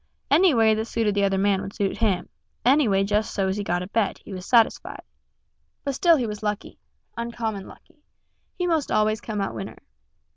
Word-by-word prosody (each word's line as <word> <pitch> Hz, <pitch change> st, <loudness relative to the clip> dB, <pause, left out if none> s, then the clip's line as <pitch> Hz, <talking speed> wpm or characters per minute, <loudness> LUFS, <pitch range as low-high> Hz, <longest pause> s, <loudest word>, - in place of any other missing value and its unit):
Any 330 Hz, +1 st, +5 dB
way 220 Hz, -1 st, +4 dB
that 220 Hz, +1 st, -1 dB
suited 225 Hz, -2 st, 0 dB
the 200 Hz, 0 st, +1 dB
other 195 Hz, -1 st, +1 dB
man 195 Hz, 0 st, +2 dB
would 195 Hz, -, -7 dB
suit 200 Hz, 0 st, -2 dB
him 195 Hz, -6 st, +1 dB, 0.4 s
any 275 Hz, +1 st, +5 dB
way 195 Hz, -1 st, +2 dB
just 210 Hz, +2 st, 0 dB
so's 190 Hz, -1 st, 0 dB
he 205 Hz, -, -2 dB
got 175 Hz, -1 st, -1 dB
a -, -, -7 dB
bet, 210 Hz, -1 st, 0 dB
he 200 Hz, -, -8 dB
was 185 Hz, 0 st, -7 dB
satisfied. 230 Hz, -3 st, +2 dB, 0.8 s
But 280 Hz, -, -2 dB
still 335 Hz, +5 st, +4 dB
he 250 Hz, -, -1 dB
was 210 Hz, -2 st, -5 dB
lucky, 210 Hz, 0 st, -4 dB, 0.4 s
uncommon 230 Hz, -4 st, -4 dB
lucky; 335 Hz, -3 st, -17 dB, 0.6 s
he 360 Hz, -, -1 dB
most 325 Hz, -5 st, 0 dB
always 215 Hz, 0 st, +2 dB
come 210 Hz, -2 st, -4 dB
out 195 Hz, -, -2 dB
winner. 195 Hz, -, -7 dB
215 Hz, 195 wpm, -24 LUFS, 195-235 Hz, 0.8 s, Any